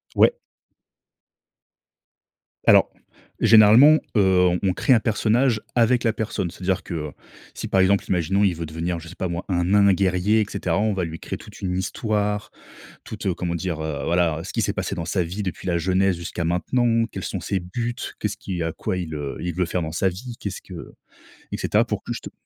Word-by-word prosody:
Ouais. - - +5 2.3
Alors, - - +6 0.5
généralement, 115 +8 +7 0.2
heu, 90 -2 +4
on 95 -2 +2
crée 130 - +3
un 115 - +5
personnage 115 +1 +1
avec 120 +1 +3
la 110 -2 +2
personne, 105 -5 -3
c'est 95 - -12
à - - -4
dire 95 0 0
que, - - -7
heu, 75 -2 -4 0.4
si, - - -6
par 95 - +3
exemple, 100 +1 +3
imaginons, 95 +3 +1
il 90 -4 +2
veut 85 0 -5
devenir, 85 +2 -3
je 85 - -11
sais 90 - -11
pas 95 - -2
moi, 85 +1 -4
un 90 -1 +1
nain 100 +1 +5
guerrier, 95 +3 +2
et - - +1
cetera, 90 +2 -1
on 110 -1 +1
va 95 -2 -1
lui 80 0 -5
créer - - -5
toute - - -13
une 90 -1 -2
histoire, 105 +1 -2 0.5
toute 95 - -3
comment 85 -2 -3
dire? 85 -2 -3
Heu, 75 -2 -3
voilà, 85 -2 +1
ce 95 - -7
qui - - 0
s'est - - 0
passé - - -3
dans 85 - -4
sa 95 - 0
vie 90 +5 -4
depuis 90 -1 -5
la 85 -1 +1
jeunesse 95 +1 +1
jusqu'à 85 0 -5
maintenant. 115 +7 +1
Quels 95 - -5
sont 95 - -4
ses 95 +2 -2
buts? 120 +7 -4 0.2
Qu'est - - -1
ce - - -6
qui 90 -3 -4
heu, - - -1
à 80 - -2
quoi 95 - -3
il, 80 -3 -4
heu, 70 -2 -5
il 85 -2 -3
veut 90 -1 0
faire 90 +1 -2
dans 80 0 -4
sa 95 +3 +1
vie? 115 +7 -7
Qu'est 100 - -3
ce - - -7
que 90 -4 -10 0.6
et - - -1
cetera, - - +2
pour - - -4
que - - -4
juste - - -7
95 Hz, 220 wpm, -23 LUFS, 85-105 Hz, 2.3 s, généralement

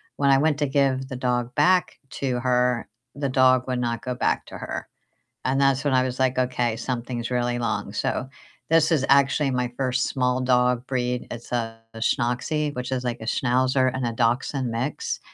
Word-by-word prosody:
when 140 -1 +3
I 135 - +5
went 150 -1 +2
to 145 - +2
give 135 -1 +1
the 130 - -5
dog 125 -1 -1
back 180 +4 +3 0.2
to 130 -3 -1
her, 125 -1 +1 0.3
the 140 -1 -2
dog 130 0 +4
would 125 - -1
not 120 -1 -2
go 125 -1 -3
back - - 0
to - - -8
her. - - -5 0.6
And 135 +1 +1
that's 135 0 +3
when 145 -2 +1
I 130 0 +4
was 130 0 -4
like, 130 -1 +2
"Okay, 125 -2 0
something's 120 -1 -3
really 120 0 0
long," 105 -4 -2
so 130 +5 -2 0.4
this 165 0 +4
is 140 -4 +2
actually 140 0 +4
my 125 -1 -1
first 130 -1 0
small 125 -1 0
dog 125 -1 +2
breed. 125 -1 -2
It's 120 +1 -8
a 115 -2 -2 0.2
Schnoxie, 125 +6 0
which 125 +1 -4
is 125 -1 -2
like 120 -1 -3
a 110 - -6
Schnauzer 130 +2 +2
and 130 -1 -2
a 115 - -2
Dachshund 120 +2 0
mix. 150 - -3
125 Hz, 190 wpm, -24 LUFS, 125-135 Hz, 0.6 s, I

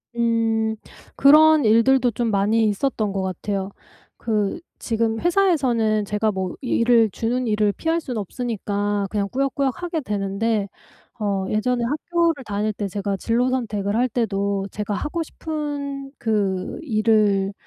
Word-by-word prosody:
음. 225 -1 +1 0.4
그런 305 +1 +6
일들도 240 +3 +4
좀 230 0 -1
많이 210 +3 +2
있었던 210 -1 -1
것 195 - -2
같아요. 190 +1 -3 0.5
그 215 - -1 0.2
지금 225 -1 -1
회사에서는 260 - +2
제가 210 +1 0
뭐 190 -2 -3
일을 230 -3 +3
주는 245 +2 -1
일을 210 -1 +2
피할 325 +1 -1
수는 250 -8 -4
없으니까 205 -2 -2
그냥 205 -2 -1
꾸역꾸역 275 +4 -1
하게 340 -2 -2
되는데 205 -1 -1 0.5
어 200 -3 -1
예전에 240 +3 0
학교를 315 +3 0
다닐 210 +1 -1
때 200 0 -3
제가 200 0 -3
진로 240 +5 +1
선택을 210 -5 -2
할 245 +2 +2
때도 200 -4 -1
제가 210 -1 -3
하고 325 - -2
싶은 285 -3 -5
그 200 -5 -1
일을 215 -5 +2
225 Hz, 275 characters per minute, -22 LUFS, 205-260 Hz, 0.5 s, 그런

